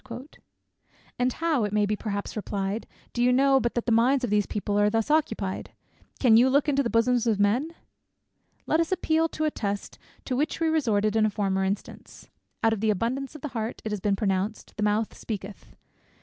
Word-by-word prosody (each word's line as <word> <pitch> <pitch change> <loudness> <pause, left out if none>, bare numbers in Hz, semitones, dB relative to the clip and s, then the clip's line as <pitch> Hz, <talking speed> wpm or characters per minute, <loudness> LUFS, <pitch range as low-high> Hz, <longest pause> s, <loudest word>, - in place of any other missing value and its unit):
"And 250 +1 +2
how," 320 -7 0
it 205 - -1
may 210 0 +2
be 210 +1 0
perhaps 205 -1 -4
replied, 200 0 -3 0.3
"do 240 - -1
you 250 +1 +4
know, 270 +1 +4
but 235 -2 -2
that 240 - -1
the 240 - 0
minds 250 +4 +3
of 240 - -1
these 210 -1 +2
people 205 0 -1
are 205 0 +4
thus 225 +5 0
occupied? 220 -11 -1 0.5
Can 230 -4 +6
you 250 +3 +5
look 285 +3 +2
into 280 -1 +2
the 240 - -1
bosoms 240 +1 +2
of 215 -3 +1
men?" 245 +11 +1 0.9
Let 315 - +2
us 335 +1 0
appeal 325 -3 +1
to 310 - -2
a 305 - +1
test 200 -5 -4 0.3
to 255 - -2
which 295 +4 -1
we 325 -1 +2
resorted 220 -9 +1
in 215 -1 +4
a - - 0
former 195 -2 -1
instance. 195 +1 -5 0.3
"Out 225 0 +4
of 210 - -4
the 220 - +2
abundance 255 +8 -1
of 305 - -9
the 300 - -4
heart," 225 -2 -4
it 215 - -2
has 210 - -2
been 200 +1 +1
pronounced, 195 +1 -2
"the 215 - -5
mouth 210 +1 0
speaketh." 205 -2 -7
225 Hz, 205 wpm, -26 LUFS, 205-270 Hz, 0.9 s, Can